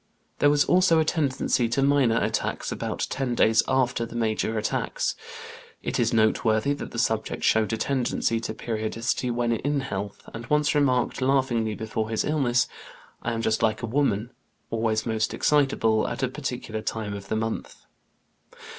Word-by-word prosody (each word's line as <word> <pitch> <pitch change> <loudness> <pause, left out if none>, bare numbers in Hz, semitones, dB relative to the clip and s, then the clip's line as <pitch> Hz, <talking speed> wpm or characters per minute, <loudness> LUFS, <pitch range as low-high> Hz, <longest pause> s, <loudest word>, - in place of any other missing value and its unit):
There 145 - +5
was 145 0 +3
also 180 -2 +4
a 160 - +2
tendency 135 -6 +1
to 135 +4 +1
minor 135 -5 +3
attacks - - -2
about - - -2
ten 130 -2 -1
days 110 -1 +4
after 130 -3 +1
the 115 - -7
major 110 -1 0
attacks. 110 - -1 0.7
It - - -2
is 115 -2 +2
noteworthy 110 +3 +2
that 145 - -6
the - - -8
subject 110 -1 -1
showed 110 0 +3
a 115 - -1
tendency 125 -3 0
to 110 -1 -5
periodicity 115 +2 -2
when 120 0 0
in 140 +5 0
health, 100 -5 -5
and 115 +1 -7
once 150 0 +2
remarked 130 -4 +1
laughingly 130 -5 +1
before 110 0 -3
his 110 - 0
illness: 130 -6 +2 0.5
"I 120 - -2
am 115 0 -3
just 110 -1 +1
like 110 +1 +1
a - - +1
woman, 120 -2 0 0.4
always 110 -1 0
most 110 -2 -1
excitable 135 -7 +2
at 135 - -4
a - - +3
particular 125 -5 -4
time 110 -2 -3
of 100 -1 -7
the 110 - -1
month." 110 0 -4
115 Hz, 165 wpm, -25 LUFS, 110-135 Hz, 0.7 s, There